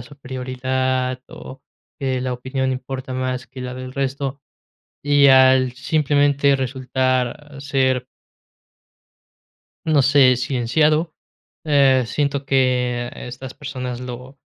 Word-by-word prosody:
superioridad, 130 -1 -3
o 130 - -11 0.4
que 130 -2 -1
la 130 - -2
opinión 130 +1 -2
importa 130 0 -6
más 130 0 -3
que 130 - -11
la 125 0 -5
del 130 0 -7
resto, 135 0 -3 0.6
y 145 -1 +5
al 130 -1 +5
simplemente 145 0 +2
resultar 130 +2 -2
ser 130 -3 0 1.8
no 155 -3 +3
sé, 135 -2 +5
silenciado, 150 +6 +1 0.5
eh, 135 -4 +4
siento 140 +2 -1
que 125 -2 +1
estas 125 +1 -8
personas 125 -4 -5
lo 125 +2 -8
130 Hz, 105 wpm, -21 LUFS, 125-140 Hz, 1.8 s, y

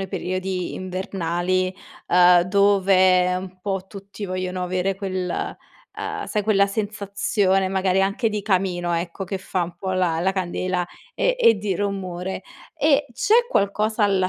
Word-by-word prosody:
i 195 - -4
periodi 185 0 -3
invernali, 185 0 -2 0.3
ehm, 180 0 +6
dove 185 -1 +4
un 185 0 -8
po' 195 -1 -3
tutti 200 +1 -9
vogliono 185 -1 -3
avere 185 +2 -1
quel, 185 -2 -3 0.5
uhm, - - -4
sai 210 - -1
quella 200 -1 +3
sensazione 200 -1 0
magari 190 0 +1
anche 200 +4 +1
di 210 -1 -3
camino 180 -3 0
ecco 170 +3 -3
che 190 +1 -4
fa 185 -1 -2
un 170 0 -5
po' 190 +2 -3
la 180 -3 +1
la 190 +2 +1
candela, 185 -1 -2 0.3
ehm, - - +1
e 230 - +5
di 200 -1 -1
rumore. 190 -2 -3 0.3
E 290 -2 +3
c'è 445 - +3
qualcosa 215 - +1
alla 195 -2 +2
190 Hz, 145 wpm, -23 LUFS, 180-200 Hz, 0.5 s, ehm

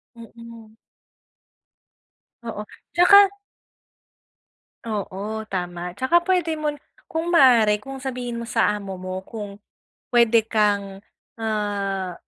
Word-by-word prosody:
Mm. 230 -1 -13 1.7
Oo, 220 -2 -5 0.3
tsaka 360 +3 +7 1.7
Oo, 210 0 -4
tama. 180 -1 -5
Tsaka 300 +7 +3
pwede 345 -2 0
mon 300 -1 -3 0.3
kung 330 +2 -2
maaari, 230 -8 +5
kung 270 +2 -8
sabihin 250 -2 -5
mo 235 - -5
sa 230 - +1
amo 195 -2 -7
mo 185 +1 -6
kung 205 -3 -8 0.6
pwede 235 -2 +4
kang, 205 -3 0 0.4
ah, 200 -4 -2
220 Hz, 100 wpm, -23 LUFS, 200-255 Hz, 1.7 s, tsaka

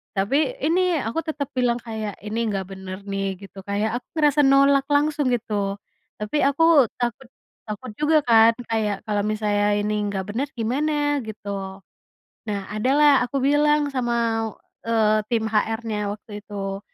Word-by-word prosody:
Tapi, 280 - +1
ini 360 +2 +2
aku 230 +9 -2
tetap 290 -3 -3
bilang 245 -2 +1
kayak, 220 -4 -5
"Ini 215 +2 -3
nggak 195 -3 -2
bener 190 0 -8
nih," 195 -1 -3
gitu. 195 +1 -12
Kayak 215 +4 -1
aku - - -39
ngerasa 295 -1 +3
nolak 275 0 +4
langsung 295 0 +1
gitu. 210 -5 -1 0.4
Tapi 210 +8 -2
aku 285 -1 +4
takut 245 +1 -3 0.4
takut 215 +3 -6
juga 305 +1 +4
kan, 230 -1 +6 0.2
kayak 210 -3 -1
kalau 205 -1 0
misalnya 210 -1 0 0.2
ini 210 +1 -1
nggak 200 -1 -2
bener, 250 +7 -2
gimana 290 +5 0
gitu. 200 -2 -6 0.7
Nah, 205 -1 -1
ada 215 +4 -1
lah 295 -1 +7
aku 245 +2 -3
bilang 295 0 +3
sama, 235 -2 0 0.3
eee, 220 -2 +2
tim 225 -2 0
HR-nya 220 -1 -1
waktu 210 0 -10
itu, 195 -1 -5
225 Hz, 150 wpm, -23 LUFS, 205-280 Hz, 0.7 s, lah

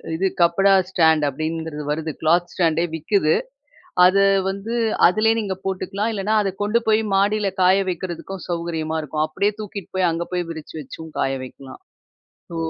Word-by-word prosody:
இது 190 - -1
கப்படா 180 +3 +4 0.2
ஸ்டாண்ட் 160 -4 +3
அப்படிங்கிறது 155 +1 -4
வருது. 160 +1 -2
க்ளாத் 170 +2 +2
ஸ்டாண்டே 165 -2 +1
விக்குது. 160 0 +1 0.7
அத 185 +2 +5 0.3
வந்து 200 +4 -4 0.3
அதிலேயே 215 +5 +3
நீங்க 195 -3 -3
போட்டுக்கலாம். 195 +3 -2
இல்லைனா 210 +2 -1
அத 195 - -1
கொண்டு 215 +3 +2
போய் 220 0 +4
மாடியில 200 +1 +2
காய 185 +2 +5
வைக்கிறதுக்கும் 180 +2 -6
சௌகரியமா 165 -2 -2
இருக்கும். 150 +1 -1
அப்படியே 200 +6 0
தூக்கிட்டு 200 -3 -7
போய் 185 -2 +3
அங்க 165 +1 -3
போய் 175 -1 -2
விரிச்சு 160 -1 -8
வச்சும் 160 +3 -9
காய 135 - +1
வைக்கலாம். 130 - -12 0.7
ஸோ 170 - -6
175 Hz, 150 wpm, -21 LUFS, 160-195 Hz, 0.7 s, அத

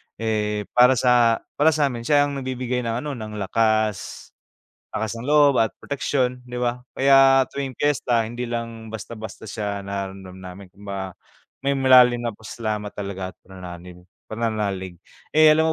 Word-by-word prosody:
Eh, 105 -2 -1
para 125 +1 +6
sa 120 -2 +3 0.2
para 155 +2 +6
sa'min 135 -6 0
siya 145 -1 +5
ang 140 -1 -4
nagbibigay 130 -1 -3
ng 115 +3 -3
ano 150 - -3
ng 110 -3 -7
lakas, 110 0 -1 0.6
lakas 110 +1 -3
ng 115 +2 -7
loob 145 -2 +5
at 110 - +2
proteksiyon 130 -3 -1
'di 125 0 -7
ba? 125 0 -1 0.2
Kaya 135 -1 +6
tuwing 135 -3 -4
piyesta 125 -5 +1
hindi 120 +2 -5
lang 115 -1 -5
basta-basta 110 0 -8
siya 100 -2 -3
nararamdam 95 -1 -6
namin 95 +2 -10
kumbaga 100 -2 -6 0.5
may 140 0 +2
malalim 125 -2 +6
na 115 - -2
pasasalamat 110 -2 -4
talaga 100 -2 -6
at - - -29
pananaling 90 -1 -10 0.2
pananalig. 105 -5 -3 0.3
Eh, 155 0 +6
alam 160 +1 +2
115 Hz, 150 wpm, -23 LUFS, 105-130 Hz, 0.6 s, para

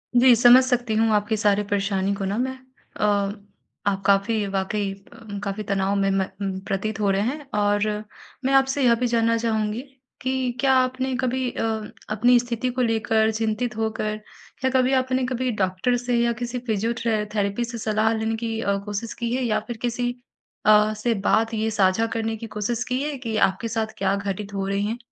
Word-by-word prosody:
जी, 245 0 +7
समझ 245 +2 +7
सकती 250 -3 0
हूँ 225 +1 +3
आपकी 210 +1 +1
सारी 205 -1 +2
परेशानी 195 -1 0
को 195 -1 -3
ना 200 +3 -1
मैं 260 +1 -2 0.4
अ, - - +1 0.8
आप 195 -1 +1
काफ़ी 200 +2 +2
वाक़ई 195 +1 -1
अ, 200 +1 -10
काफ़ी 200 +1 -3
तनाव 195 0 0
में 195 0 +2
म 195 0 -2
प्रतीत 205 +2 -2
हो 205 - +2
रहे 195 - +1
हैं 275 +6 -3
और 205 +1 +2 0.6
मैं 270 - +2
आपसे 270 +1 +3
यह 235 -2 +5
भी 250 - +1
जानना 230 -1 +2
चाहूँगी 220 0 -1 0.4
कि 260 -1 0
क्या 270 -1 +4
आपने 255 0 +1
कभी 255 0 0
अ, - - -3 0.5
अपनी 240 +4 +4
स्थिति 240 +1 -2
को 255 +1 -2
लेकर 220 -1 +2
चिंतित 225 +2 -2
होकर 220 -1 -1 0.5
या 260 - +3
कभी 255 +1 +2
आपने 255 0 +1
कभी 255 0 -1
डॉक्टर 195 +4 0
से 245 0 -1
या 235 0 +2
किसी 245 +1 -3
फिजियोट्रे 225 0 0
थेरेपी 200 +3 0
से 235 0 -6
सलाह 215 0 +1
लेने 220 +1 -1
की 225 0 -3
अ, 200 0 +1
कोशिश 210 +2 -4
की 235 0 -3
है? 260 - -1
या 220 -3 +1
फिर 240 - -5
किसी 245 0 -1 0.5
अ, 215 0 +5
से 220 +2 0
बात 225 +2 +1
ये 220 0 0
साझा 200 +1 +2
करने 225 0 -1
की 230 - -7
कोशिश 230 +3 -1
की 255 +1 0
है 295 -2 -3
कि 230 -4 -4
आपके 190 +5 -5
साथ 220 -1 -2
क्या 195 0 +1
घटित 200 0 -4
हो 195 -1 -2
रहे 200 0 0
हैं? 215 +3 -2
225 Hz, 190 wpm, -24 LUFS, 205-245 Hz, 0.8 s, जी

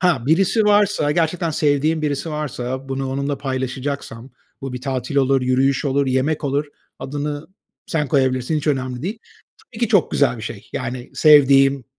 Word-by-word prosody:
Ha, 175 -9 +2
birisi 195 +8 +3
varsa 205 -7 +3
gerçekten 165 +1 0
sevdiğim 155 +1 +1
birisi 150 +2 -2
varsa 135 -3 -4
bunu 135 0 -3
onunla 140 +1 -2
paylaşacaksam 130 -2 -4 0.3
bu 135 -1 -6
bir 125 - -5
tatil 130 0 -3
olur, 135 -1 +3
yürüyüş 130 +2 +1
olur, 140 0 +1
yemek 130 +4 0
olur, 140 +1 0 0.3
adını 145 +2 -4 0.4
sen 150 -4 -1
koyabilirsin, 130 +2 +1
hiç 150 - -4
önemli 130 -3 -1
değil. 205 +7 -4 0.5
Tabii 225 - -12
ki 235 - +1
çok 200 -6 +3
güzel 140 -3 +2
bir 110 - -9
şey, 105 -1 -8
yani, 125 0 -5
sevdiğim, 140 -3 +5
140 Hz, 160 wpm, -20 LUFS, 130-155 Hz, 0.5 s, sevdiğim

